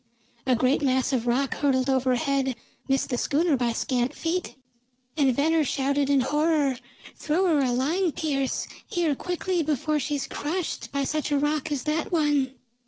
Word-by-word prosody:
A 255 - +4
great 255 +5 +2
mass 260 -1 +1
of 245 -2 0
rock 260 +3 +1
hurtled 260 -2 +1
overhead, 265 0 +1 0.3
missed 270 +1 +1
the 245 - 0
schooner 310 +1 +2
by 240 -2 0
scant 250 +3 -1
feet, 345 +2 -2 0.6
and 275 -5 +3
Venner 315 +3 +3
shouted 280 0 0
in 280 -2 +4
horror: 295 -1 +1 0.4
"Throw 325 +5 0
her 325 -5 +3
a 260 -3 +2
line, 315 +9 +1
Pearse! 275 -4 -1 0.2
Here, 340 -4 0
quickly, 360 +3 -2
before 305 0 0
she 295 +2 -2
is 280 - -2
crushed 330 +4 -4
by 280 0 -1
such 305 +2 -1
a 290 - +3
rock 295 +1 0
as 275 -4 -1
that 305 +3 -1
one!" 295 -5 +1
280 Hz, 170 wpm, -26 LUFS, 265-310 Hz, 0.6 s, A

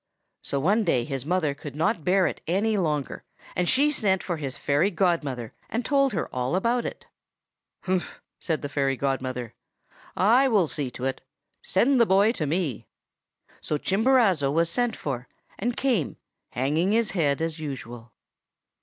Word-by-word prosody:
"So 140 - -2
one 205 +10 +2
day 130 - +2
his 135 -1 -4
mother 170 -5 +1
could 140 0 -9
not 160 +1 0
bear 185 +2 +3
it - - -2
any 205 +6 +1
longer, 150 -7 -1 0.3
and 180 -1 +1
she 285 +3 +4
sent 195 -9 +1
for 175 -3 -2
his 140 -3 -5
fairy 145 +7 +2
godmother, 160 - -1 0.2
and 230 +1 -2
told 275 -3 +2
her 170 - -1
all 125 +5 -1
about 235 +5 +1
it. - - -8 0.8
"'Humph!' 185 -1 -2 0.2
said 160 -3 -2
the - - -1
fairy 135 -2 0
godmother. 130 -3 -2 0.6
'I 235 +8 +5
will 205 -9 +3
see 145 -3 -3
to 125 +1 -6
it. 135 0 -2 0.4
Send 245 +6 +3
the 230 - +5
boy 200 +3 +4
to 160 -10 -3
me!' 155 - -2 0.7
"So 150 - -1
Chimborazo 195 - +3
was 165 +2 +1
sent 245 +2 0
for, 130 -3 -4 0.3
and 240 +4 -1
came, 240 - 0 0.3
hanging 155 +10 0
his 230 -1 +2
head 145 -7 +1
as 165 0 -3
usual. 120 -6 -7
170 Hz, 165 wpm, -26 LUFS, 140-205 Hz, 0.8 s, I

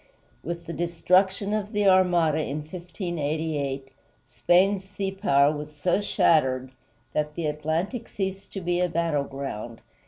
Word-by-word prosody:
With 170 +1 -5
the 170 - -5
destruction 185 +5 +1
of 215 +1 -2
the 205 -1 +2
Armada 175 -5 +4
in 150 0 -2
1588, 155 -5 -3 0.4
Spain's 180 +11 +3
sea 195 0 -4
power 150 -7 +3
was 150 0 -7
so 175 +6 +1
shattered 130 -9 +2 0.4
that 150 0 -1
the 170 - -3
Atlantic 160 - -2
ceased 195 0 -4
to 195 - -4
be 175 0 0
a 180 - +2
battleground. 140 -8 -2
170 Hz, 130 wpm, -26 LUFS, 150-190 Hz, 0.4 s, Armada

